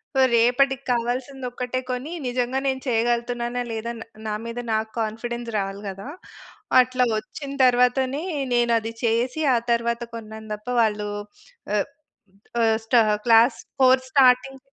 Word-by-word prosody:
So, - - +2
రేపటికి 260 +3 +3
కావాల్సిందొక్కటే 250 +1 -2
కొని 255 +5 -4 0.2
నిజంగా 250 +1 -1
నేను 265 -1 -1
చేయగలుగుతున్నానా! 240 +1 0
లేదా! 225 +1 -3
న్ - - -6 0.2
నా 210 - -1
మీద 235 +1 -5
నాకు 220 0 -1
కాన్ఫిడెన్స్ 235 +2 -3
రావాలి 195 0 -3
గదా! 195 +6 -8 0.7
అట్లా 255 0 +1
వచ్చిన 280 +4 -7
తరువాతనే 255 +4 +2 0.3
నేనది 230 -2 +1
చేసి 240 +6 +1
ఆ - - +4
తరువాత 235 0 0
కొన్నాను 220 -1 -8
దప్ప 210 +3 -9
వాళ్ళు 210 -1 0 0.7
ఆహ్, - - 0 0.7
ఆహ్, 225 -1 +3
స్టా 235 +1 +5 0.2
క్లాస్ 230 +1 +5 0.2
ఫోర్ 255 0 +5
స్టార్టింగ్ 265 0 +4
240 Hz, 125 wpm, -23 LUFS, 225-255 Hz, 0.7 s, స్టా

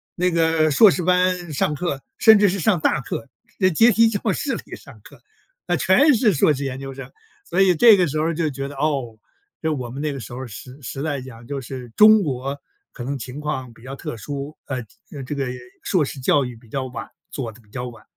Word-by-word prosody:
那 180 +1 +1
个 160 -1 +2
硕 205 +7 +7
士 180 - -1
班 180 -1 +1
上 150 +2 0
课， 145 -4 -3 0.2
甚 220 -2 +7
至 205 -2 +5
是 195 - -2
上 185 -1 +2
大 150 - +1
课， 120 -1 -6 0.3
在 185 - +4
阶 225 +8 +5
梯 230 +2 +5
教 210 -1 -1
室 270 +6 -2
里 - - -8
上 - - -15
课， - - -16 0.5
那 175 - +2
全 265 - +5
是 220 -3 +3
硕 150 +1 +3
士 140 0 -4
研 135 0 -4
究 135 0 -7
生， 135 - -9 0.3
所 190 - 0
以 185 -2 +5
这 220 +5 +7
个 180 -2 +2
时 155 +1 -2
候 160 +2 0
就 160 -1 -1
觉 135 0 -5
得， 145 - -9
哦， 135 -6 -2 0.4
就 160 -1 0
我 125 -3 -5
们 135 +3 -6
那 150 -1 -1
个 135 - -6
时 115 0 -9
候， 130 +2 -6
时 125 +4 -10
时 135 +3 -6
代 145 -4 -2
讲 120 -2 -11
就 140 +2 -4
是 125 -1 -8
中 215 -1 +7
国 135 -1 -3 0.3
可 125 - -8
能 140 +3 -3
情 125 +4 -7
况 150 -5 -4
比 110 - -19
较 135 +2 -7
特 120 - -6
殊， 145 +4 -6
呃， 135 - -3 0.3
呃 140 -3 -7
这 145 - -5
个 140 -1 -1 0.4
硕 180 -6 +2
士 140 - -5
教 140 +2 +3
育 125 -2 -6
比 115 0 -18
较 130 +3 -3
晚， 125 - -7 0.2
做 120 -5 -4
的 115 +2 -18
比 105 - -27
较 125 +2 -5
晚。 115 -3 -12
145 Hz, 260 characters per minute, -22 LUFS, 130-180 Hz, 0.5 s, 硕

